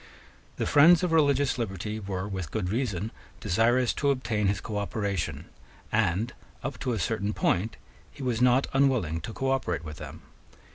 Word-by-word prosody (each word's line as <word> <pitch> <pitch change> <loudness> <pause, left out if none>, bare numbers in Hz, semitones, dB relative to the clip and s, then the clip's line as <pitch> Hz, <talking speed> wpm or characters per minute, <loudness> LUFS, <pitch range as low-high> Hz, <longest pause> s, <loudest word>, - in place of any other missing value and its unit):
The - - -2
friends 160 +4 +6
of 180 - +1
religious 140 -4 +3
liberty 105 0 -3
were 95 -1 -4
with 95 -6 -4
good 90 0 -2
reason 110 -4 -1 0.3
desirous 115 +5 +2
to 140 - 0
obtain 115 -6 0
his 100 0 +1
cooperation; 100 -2 -3 0.5
and, 105 +8 +1 0.3
up - - -4
to 125 - -1
a - - -1
certain 105 +2 -1
point, 110 +5 0 0.3
he 140 - -10
was 120 -2 0
not 125 +2 +4
unwilling 125 - +2
to 110 - -6
cooperate 130 -10 -1
with 75 0 -7
them. 75 +2 -9
110 Hz, 155 wpm, -28 LUFS, 95-130 Hz, 0.5 s, friends